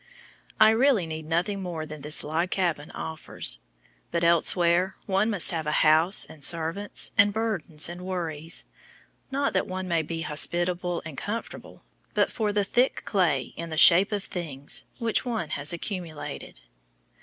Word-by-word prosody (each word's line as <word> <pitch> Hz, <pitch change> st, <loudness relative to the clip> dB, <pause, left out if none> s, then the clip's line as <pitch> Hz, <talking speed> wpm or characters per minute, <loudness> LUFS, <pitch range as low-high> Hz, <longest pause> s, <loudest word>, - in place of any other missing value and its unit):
I 220 Hz, -, +7 dB
REALLY 230 Hz, -4 st, +3 dB
need 160 Hz, -1 st, -7 dB
nothing 180 Hz, +5 st, -1 dB
more 170 Hz, -4 st, -5 dB
than 155 Hz, -1 st, -9 dB
this 150 Hz, +2 st, +2 dB
log 165 Hz, +4 st, -1 dB
cabin 170 Hz, -6 st, -1 dB
offers. 155 Hz, -, -1 dB, 0.5 s
But 170 Hz, 0 st, -1 dB
elsewhere 170 Hz, +2 st, +3 dB
one 195 Hz, +2 st, +1 dB
must 200 Hz, -5 st, +4 dB
have 160 Hz, -3 st, -3 dB
a 150 Hz, -, +2 dB
house 160 Hz, +5 st, +5 dB
and 150 Hz, -2 st, -11 dB
servants, 170 Hz, +5 st, 0 dB
and 205 Hz, 0 st, +6 dB
burdens 195 Hz, -8 st, -1 dB
and 175 Hz, +1 st, -7 dB
worries 165 Hz, -3 st, -3 dB, 0.6 s
not 280 Hz, +1 st, -1 dB
that -, -, 0 dB
one 185 Hz, 0 st, -5 dB
may 170 Hz, -2 st, +1 dB
be 165 Hz, +1 st, -5 dB
hospitable 175 Hz, +3 st, -1 dB
and 155 Hz, -4 st, -7 dB
comfortable, 225 Hz, +3 st, -7 dB, 0.3 s
but -, -, +2 dB
for 215 Hz, -3 st, -1 dB
the 205 Hz, 0 st, +1 dB
"thick 245 Hz, +6 st, +1 dB
clay" 165 Hz, -, 0 dB
in 170 Hz, 0 st, -6 dB
the 160 Hz, -, -5 dB
shape 185 Hz, +5 st, +7 dB
of 205 Hz, -2 st, -2 dB
"things" 145 Hz, -6 st, -2 dB
which 230 Hz, -3 st, +1 dB
one 225 Hz, -10 st, -3 dB
has 145 Hz, 0 st, -1 dB
accumulated. 170 Hz, -, -6 dB
170 Hz, 155 wpm, -26 LUFS, 160-200 Hz, 0.6 s, I